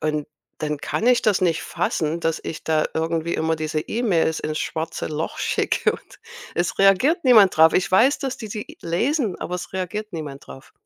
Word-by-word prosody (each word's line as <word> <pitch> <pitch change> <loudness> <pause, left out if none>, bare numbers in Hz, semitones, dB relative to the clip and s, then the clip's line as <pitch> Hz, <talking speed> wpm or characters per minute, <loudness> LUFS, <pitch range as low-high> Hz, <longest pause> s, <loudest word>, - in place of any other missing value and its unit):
Und 150 -1 -1 0.3
dann 150 -1 -2
kann 225 - -2
ich 250 -1 +5
das 200 -3 +2
nicht 170 -2 +1
fassen, 160 +1 -2
dass 165 -1 -1
ich 160 - -6
da 155 -1 +2
irgendwie 165 +1 -1
immer 160 0 0
diese 155 0 -2
E-Mails 175 -7 0
ins 155 0 -3
schwarze 160 0 -3
Loch 155 +1 -4
schicke - - +1
und 395 - -13 0.3
es 175 0 -1
reagiert 225 - +4
niemand 215 -7 +6
drauf. 160 0 +6
Ich 185 - +1
weiß, 245 +9 +4
dass 265 -2 -3
die 220 - -7
die 210 +1 -7
lesen, 225 - 0
aber 180 - -4
es 180 - -8
reagiert 210 +3 -4
niemand 145 -4 -7
drauf. 65 0 -13
170 Hz, 190 wpm, -22 LUFS, 160-215 Hz, 0.3 s, niemand